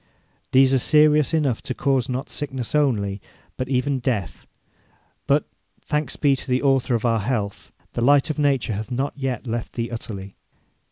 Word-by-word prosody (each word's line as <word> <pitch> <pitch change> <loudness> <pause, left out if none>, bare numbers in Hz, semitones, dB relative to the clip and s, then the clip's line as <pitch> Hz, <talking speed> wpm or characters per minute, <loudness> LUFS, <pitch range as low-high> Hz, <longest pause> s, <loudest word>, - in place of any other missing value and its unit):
These 135 0 +5
are 135 - +4
serious 150 +2 +4
enough 145 -8 +1
to 130 - -4
cause 135 -3 +1
not 130 +1 -3
sickness 135 -5 -4
only, 105 -10 +1 0.3
but 130 0 -4
even 135 +1 0
death; 120 -7 -3 0.8
but, - - +2 0.4
thanks 150 -3 -1
be 140 -2 +3
to - - -8
the 130 +1 +1
Author 135 -2 +2
of 115 - -2
our 115 -1 +2
health, 105 -2 -3 0.2
the - - -2
light 145 +4 +4
of 155 - -6
nature 135 -6 +1
hath 105 +1 -4
not 135 +3 -2
yet 135 -3 -3
left 115 -1 -4
thee 115 0 -3
utterly. 100 -4 -7
130 Hz, 170 wpm, -23 LUFS, 115-140 Hz, 0.8 s, These